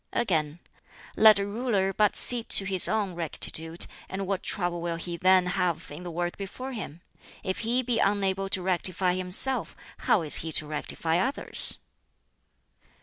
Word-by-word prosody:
Again, 160 -9 -2 0.6
"Let 215 -1 +6
a 200 - -2
ruler 205 -3 -2
but 210 +1 +1
see 245 -2 +6
to 195 - +4
his 190 -2 +5
own 210 -4 -2
rectitude, 165 0 -3 0.2
and 195 +1 -5
what 195 -1 -3
trouble 175 -3 -3
will 170 0 -4
he 170 +1 -7
then 185 +1 +3
have 180 -4 -3
in 150 +4 -10
the 180 - -8
work 175 +1 -5
before 250 +7 -8
him? 180 - -8 0.4
If 190 -1 -4
he 240 +3 -1
be 235 -2 -2
unable 195 -1 -1
to 185 -2 -3
rectify 185 0 -1
himself, 185 +9 -2 0.2
how 180 - 0
is 150 - +7
he 160 - -4
to 155 - +4
rectify 160 +2 -3
others?" 265 +8 +4
185 Hz, 160 wpm, -25 LUFS, 175-205 Hz, 0.6 s, is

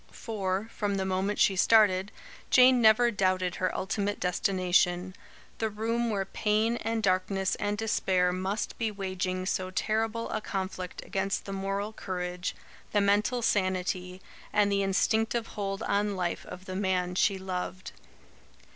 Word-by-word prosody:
For, 200 -2 -3
from 205 -2 -1
the 190 -1 -1
moment 190 +2 -1
she 195 - +4
started, 200 -1 +4 0.4
Jane 255 -1 +6
never 230 +2 +5
doubted 185 -3 0
her 185 - +2
ultimate 200 +1 -2
destination, 180 0 +1 0.4
the 220 - 0
room 230 +3 -1
where 200 -3 -1
pain 220 +3 +1
and 225 -1 -2
darkness 190 0 +1
and 205 0 -1
despair 185 -4 +1
must 190 +3 -3
be 225 -2 +1
waging 185 -2 -3
so 185 0 -1
terrible 220 +4 -1
a 215 - -2
conflict 190 -3 -5
against 195 0 -2
the 195 - -5
moral 195 +2 -3
courage, 180 -2 -4 0.4
the 210 - +4
mental 210 +5 +2
sanity, 185 -2 -1 0.3
and 205 -1 +3
the 200 0 +2
instinctive 220 +4 +1
hold 195 0 -3
on 205 0 0
life 180 -2 -3
of 185 +1 -9
the 185 - -6
man 185 -2 0
she 195 +2 +2
loved. 185 -1 -5
195 Hz, 145 wpm, -29 LUFS, 185-215 Hz, 0.4 s, Jane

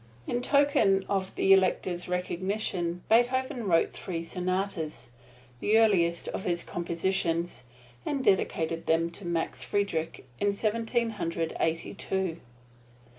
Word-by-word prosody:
In 245 - -1
token 265 -9 +3
of 190 -1 -1
the 195 - +5
Elector's 185 -2 +1
recognition 180 -1 -2
Beethoven 245 +1 +2
wrote 165 -3 +3
three 170 -2 -4
sonatas, 180 -3 -3 0.5
the 215 - +3
earliest 175 -7 +3
of - - -4
his 170 -1 -1
compositions, 170 -4 -1 0.4
and 275 -2 -2
dedicated 165 -5 +1
them 165 +1 +2
to 175 +1 -7
Max 170 -1 -2
Friedrich 165 -8 -2
in 205 0 +2
Seventeen 230 +2 0
Hundred 165 -5 -3
Eighty 165 0 -1
two. 190 -3 -2
185 Hz, 120 wpm, -28 LUFS, 170-205 Hz, 0.5 s, the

